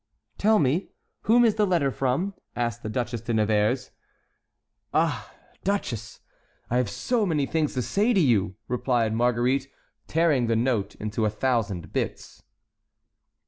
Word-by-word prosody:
"Tell 215 +1 +4
me, 150 +4 +1 0.4
whom 240 +2 +5
is 225 - +4
the 210 -1 +3
letter 165 -7 +2
from?" 135 +11 -1 0.2
asked 120 -1 -2
the 110 - -5
Duchesse 120 0 -2
de 115 0 -2
Nevers. 110 +4 +1 1.0
"Ah, - - +1 0.3
duchess, 120 - -3 0.5
I 125 - +2
have 125 -4 +1
so 240 - 0
many 155 -7 +1
things 150 0 -1
to 125 - 0
say 210 - +1
to 210 - +3
you!" 110 - +2
replied 120 -3 0
Marguerite, 125 +3 +1 0.4
tearing 155 -7 +2
the 115 - +2
note 115 -3 0
into 105 +1 -3
a - - +3
thousand 105 -6 -1
bits. - - -4
125 Hz, 140 wpm, -26 LUFS, 115-160 Hz, 1.0 s, whom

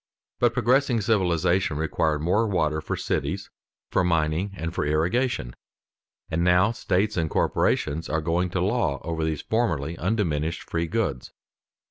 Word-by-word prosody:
But - - +2
progressing 125 0 +3
civilization 90 -5 +1
required 80 -1 0
more 105 +7 +2
water 80 -6 0
for - - -3
cities, - - -2 0.4
for - - +2
mining, 85 +2 +1
and 80 +1 -4
for - - -1
irrigation, 80 - 0 0.7
and 80 +1 -1
now 90 +4 +4
states 105 -3 0
and 80 -2 0
corporations 75 +1 0
are 80 - +1
going 85 +3 0
to 90 0 -1
law 100 - 0
over 80 -1 -2
these 80 -2 -2
formerly 85 - 0
undiminished 85 -5 -1
free 85 0 -1
goods. 90 - -2
85 Hz, 140 wpm, -25 LUFS, 80-100 Hz, 0.7 s, now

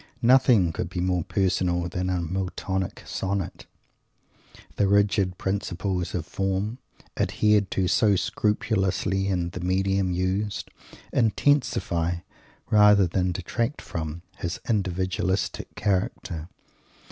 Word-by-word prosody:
Nothing 120 -8 +5
could 85 - -3
be 90 - -4
more 90 -1 +1
personal 90 -2 0
than 90 +1 -2
a 90 -2 0
Miltonic 95 +1 -3
Sonnet. 95 -1 -3 1.1
The 100 - +3
rigid 100 -2 +2
principles 95 -2 -2
of 85 -3 -2
form, 95 +6 -2 0.4
adhered 105 -2 +2
to 95 -1 0
so 100 +2 +4
scrupulously 95 -2 0
in 90 -3 -1
the 90 - -6
medium 95 +1 +1
used, 95 +3 -1 0.4
intensify, 110 - +1 0.5
rather 105 -2 +6
than 90 +1 0
detract 115 - -2
from, 80 0 -5
his 85 -1 -4
individualistic 95 -2 -1
character. 95 -4 -2
95 Hz, 105 wpm, -26 LUFS, 90-100 Hz, 1.1 s, rather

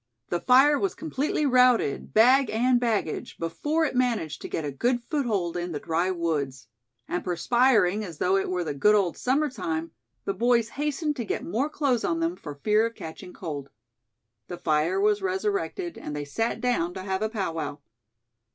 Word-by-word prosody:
The 175 - 0
fire 270 +7 +5
was 390 -2 -1
completely 305 -1 -1
routed, 250 - +3
bag 255 +4 +5
and 245 +3 +2
baggage, 225 -9 -2
before 295 - -1
it - - -2
managed 240 -11 0
to - - -5
get 160 - -3
a 145 - -3
good 240 - 0
foothold 210 - 0
in 175 -1 -3
the 145 - -3
dry 170 +4 0
woods. 145 - -2 0.4
And 175 - -2
perspiring 210 +2 +2
as 170 -6 -8
though 185 +5 +2
it 195 - 0
were 180 -1 -1
the 150 -3 -3
good 210 +10 +4
old 190 -5 +1
summer 280 +4 +1
time, 165 - -4 0.3
the 195 - -1
boys 235 +2 +2
hastened 295 +2 -2
to 240 - -2
get 210 - -3
more 250 - -1
clothes 275 -6 0
on 330 - 0
them, 330 +1 0
for 145 - -8
fear 210 +9 +2
of 230 - -10
catching 180 -1 -9
cold. 145 -7 -6 0.8
The 175 - -6
fire 155 - +1
was 415 0 +2
resurrected, 385 -2 -2
and 150 - -6
they 145 0 -4
sat 225 +10 -2
down 215 -9 0
to 190 - -5
have 190 0 -2
a 215 - 0
powwow. 165 -9 -3
215 Hz, 185 wpm, -26 LUFS, 170-260 Hz, 0.8 s, fire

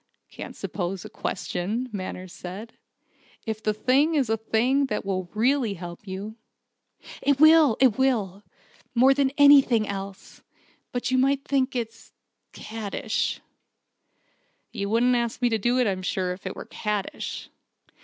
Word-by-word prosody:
"I - - -25
can't - - -8
suppose 185 0 -4
a - - -9
'question,'" 215 +8 -3
Manners 185 -2 -6
said, 195 +6 -8 0.7
"if 220 -2 -4
the 215 - +1
thing 265 +9 +2
is 265 -7 +1
a 225 - +2
thing 245 +6 +1
that - - -3
will 185 -2 -2
really 240 -1 +2
help 175 +2 -9
you." 200 +4 -6 0.8
"It 280 -1 +2
will 310 -6 +7
it 260 -3 +4
will, 210 -8 +1 0.5
more 260 +3 +6
than 275 -1 +2
anything 275 -6 +6
else. 195 -1 -7 0.5
But 245 +1 -2
you 255 - +3
might 275 +1 +2
think 265 -1 +1
it 230 -2 -3 0.6
caddish." 220 0 -3 1.3
"You 200 0 -3
wouldn't 240 +3 +3
ask 235 -1 -1
me 245 -1 +2
to 225 -1 0
do 240 +5 +1
it, 250 - +3
I'm 190 -3 -1
sure, 185 0 -1
if 185 +1 -9
it 185 - -5
were - - -8
caddish." 210 -2 -4
225 Hz, 150 wpm, -25 LUFS, 195-260 Hz, 1.3 s, will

